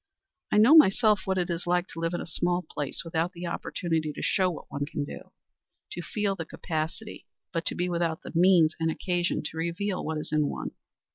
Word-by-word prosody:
I - - +3
know 225 +8 +7
myself 215 -6 +6
what 190 0 0
it 180 -1 0
is 170 +1 -3
to - - -4
have 180 0 +2
lived 165 +1 -1
in - - -3
a - - -5
small 175 +2 0
place 145 +2 -4
without 165 +2 -1
the 175 0 -6
opportunity 165 -2 -2
to - - -7
show 185 -2 +2
what 170 - -8
one 145 0 -2
could 145 -1 -3
do; - - -9 0.6
to 175 - -5
feel 205 +2 -1
the 170 - -4
capacity, 160 +6 -5 0.3
but 165 -1 -2
to - - 0
be 180 - 0
without 170 -2 -1
the - - -7
means 170 -2 +5
and 160 0 +1
occasion 175 +2 -1
to 155 +1 -6
reveal 175 +4 -2
what 160 0 -2
is 150 - -5
in 150 -1 +2
one. - - -4
170 Hz, 215 wpm, -28 LUFS, 160-185 Hz, 0.6 s, know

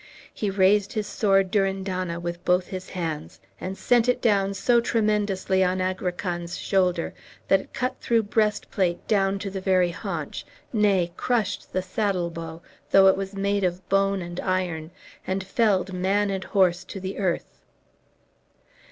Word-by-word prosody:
He 210 - -2
raised 195 +1 +3
his 215 -2 -1
sword 195 -2 +2
Durindana 190 -3 -1
with 170 0 -5
both 180 0 +2
his 185 -1 -7
hands, 160 - -4 0.2
and 190 +1 -5
sent 245 0 +3
it 250 - +2
down 200 -4 +2
so 235 +4 +3
tremendously 210 -4 +1
on 185 0 +1
Agrican's 180 -2 -2
shoulder 180 -3 +1 0.3
that 195 - +5
it - - -17
cut 255 +1 -1
through 230 -1 +2
breastplate 205 -4 0
down 195 -2 +2
to 195 0 -5
the 190 0 -4
very 185 -2 +3
haunch, 170 -4 -5 0.3
nay, 195 -5 +2
crushed 225 -5 -1
the 185 - -1
saddle 185 -3 -1
bow, 165 0 -7 0.3
though 195 0 +6
it - - +4
was 195 0 -5
made 200 0 0
of 180 0 -2
bone 195 -1 +2
and 175 +1 -6
iron, 180 -4 -1 0.4
and 190 +1 -1
felled 195 -2 +1
man 195 +3 +1
and 190 -1 -3
horse 180 -3 +2
to 195 - -7
the 190 +1 -5
earth. 185 -4 -2
190 Hz, 155 wpm, -25 LUFS, 180-200 Hz, 0.4 s, though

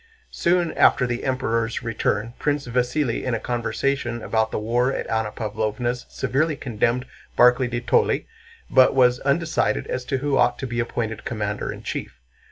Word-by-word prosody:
Soon 175 -1 +1
after 125 - +4
the 120 0 -3
Emperor's 120 -3 -1
return 115 -1 -1
Prince 145 -2 -1
Vasíli 125 +1 0
in 125 -2 -1
a - - -2
conversation 120 0 -2
about 110 0 +1
the - - -3
war 120 +4 +1
at - - -3
Anna 110 -1 0
Pávlovna's 110 +3 -3
severely 140 +4 0
condemned 120 -1 -1 0.3
Barclay 125 +1 +5
de 120 0 -3
Tolly, - - +2 0.4
but 130 0 +5
was 125 -1 +4
undecided 140 -6 0
as 125 - -3
to 135 +1 -1
who 140 +1 0
ought - - +3
to 135 - -4
be 120 -1 -3
appointed 115 -2 -3
commander 105 -3 -3
in - - -9
chief. - - -5
120 Hz, 165 wpm, -23 LUFS, 115-135 Hz, 0.4 s, Barclay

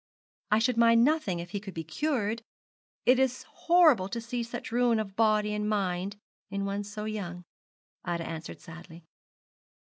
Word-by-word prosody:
'I 215 - +4
should 230 +2 +1
mind 230 0 +6
nothing 270 - +1
if 175 +1 -7
he 205 - -2
could 195 -2 -9
be 165 - -3
cured. 225 - -1 0.6
It 250 +1 +5
is 260 -1 +1
horrible 315 - +4
to 235 - -3
see 235 +1 -3
such 230 -1 -6
ruin 240 -1 +3
of 195 -3 -4
body 215 -1 +2
and 210 0 -1
mind 195 -1 -1 0.3
in 200 0 -2
one 200 +1 -2
so 210 +1 -6
young,' 180 -5 -5 0.6
Ida 170 -1 -2
answered 165 0 -7
sadly. 165 0 -12
210 Hz, 160 wpm, -29 LUFS, 185-235 Hz, 0.6 s, mind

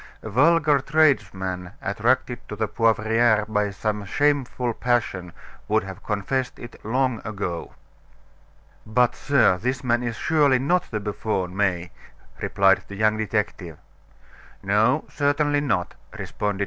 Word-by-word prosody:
A 110 - -6
vulgar 150 +4 +4
tradesman 95 - +1
attracted 120 +4 0
to 105 - -5
the 110 +1 -1
Poivriere 110 0 +2
by 105 -1 0
some 105 +1 -3
shameful 130 0 0
passion 110 -8 -1 0.4
would 110 +1 +2
have 95 -1 -9
confessed 120 +5 -2
it 120 - -11
long 125 +1 0
ago." 95 -5 -5 1.1
"But, 120 +2 +2
sir, 135 -10 +2
this 125 +5 -2
man 120 -1 +1
is 120 -2 -3
surely 145 -1 +3
not 175 +8 0
the 110 - -2
buffoon, 100 -3 -3
May," 90 -3 0 0.5
replied 95 -1 +3
the 100 - -8
young 110 +1 +2
detective. 105 -6 -3 0.9
"No, - - +2
certainly 145 0 +1
not," 100 -11 -1 0.2
responded 105 -1 -3
M. - - -9
110 Hz, 130 wpm, -24 LUFS, 100-130 Hz, 1.1 s, vulgar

